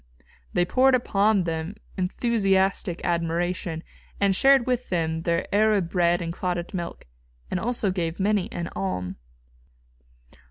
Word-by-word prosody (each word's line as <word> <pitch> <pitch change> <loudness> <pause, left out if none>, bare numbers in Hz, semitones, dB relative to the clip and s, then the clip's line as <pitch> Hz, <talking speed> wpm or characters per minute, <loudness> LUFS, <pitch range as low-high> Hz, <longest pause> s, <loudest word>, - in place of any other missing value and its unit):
They 175 - +2
poured 260 +7 +4
upon 210 -4 +2
them 165 +3 -3 0.2
enthusiastic 195 -2 +1
admiration, 170 0 -1 0.4
and 200 -1 +3
shared 270 +2 +5
with 250 -1 -1
them 160 -2 -1
their 170 +1 0
Arab 205 -4 +3
bread 175 -1 +2
and 165 0 -4
clotted 175 0 -3
milk, 170 -2 -5 0.5
and 185 - 0
also 225 -2 0
gave 170 -2 -3
many 200 -1 +1
an 170 -1 -4
alm. 90 -2 -3
180 Hz, 125 wpm, -25 LUFS, 170-205 Hz, 0.5 s, shared